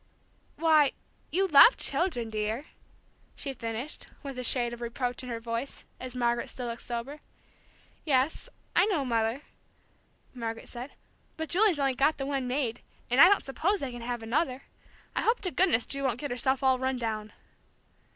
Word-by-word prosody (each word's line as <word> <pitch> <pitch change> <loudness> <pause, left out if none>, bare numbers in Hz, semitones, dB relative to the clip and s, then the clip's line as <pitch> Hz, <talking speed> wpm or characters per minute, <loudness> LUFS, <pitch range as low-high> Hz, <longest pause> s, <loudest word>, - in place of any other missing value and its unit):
Why, 310 -3 +4 0.4
you 385 +3 +2
love 335 - +8
children, 245 -11 0
dear," 215 +5 -2 0.7
she 275 - -4
finished, 235 +3 -5 0.2
with 275 -3 -6
a - - -3
shade 240 -1 +1
of 240 - -9
reproach 245 +1 -2
in 250 - -8
her 230 -1 -3
voice, 230 +3 -5
as 255 -1 -7
Margaret 240 -1 0
still 250 - -5
looked 235 0 -5
sober. 245 +5 -5 0.8
"Yes, 275 0 +1 0.3
I 360 +4 +5
know, 330 -10 0
Mother," 230 +3 0 0.9
Margaret 225 -2 -5
said. 245 +3 -7 0.4
"But 320 0 -4
Julie's 375 -3 +3
only 275 -1 +2
got 280 +5 +2
the 270 - -3
one 270 -2 -2
maid, 250 -3 -1 0.3
and 250 - +6
I 350 - +10
don't 405 - +3
suppose 365 +9 0
they 270 -2 -4
can 240 0 -8
have 240 -1 -4
another. 260 +3 -1 0.5
I - - +1
hope 465 +2 +2
to 370 -3 -3
goodness 345 -12 +2
Ju 275 - -3
won't 250 -3 0
get 290 -1 -4
herself 260 +2 0
all 260 -1 +4
run 260 0 0
down!" 215 -3 -4
255 Hz, 170 wpm, -29 LUFS, 235-290 Hz, 0.9 s, I